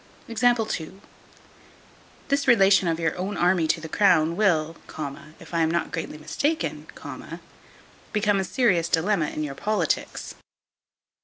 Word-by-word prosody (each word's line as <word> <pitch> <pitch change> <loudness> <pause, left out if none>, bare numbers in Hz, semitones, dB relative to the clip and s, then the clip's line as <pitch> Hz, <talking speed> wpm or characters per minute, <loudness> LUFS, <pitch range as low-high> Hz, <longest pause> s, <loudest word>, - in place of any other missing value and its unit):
This 230 - -4
relation 195 -6 +5
of 165 -1 0
your 165 -1 0 0.2
army 175 -2 +3
to 165 - +1
the 160 - -7
crown 165 -3 +3
will, 165 -6 +2 0.6
if - - -14
I 170 - +1
am 160 - +3
not 170 -1 -1
greatly 165 -3 -5
mistaken, 285 - -2 1.2
become 210 -1 +2
a - - 0
serious 185 -6 +1
dilemma 170 -1 +1
in 155 - -4
your 145 -2 -4
politics. 200 +1 -2
180 Hz, 115 wpm, -25 LUFS, 160-210 Hz, 1.2 s, relation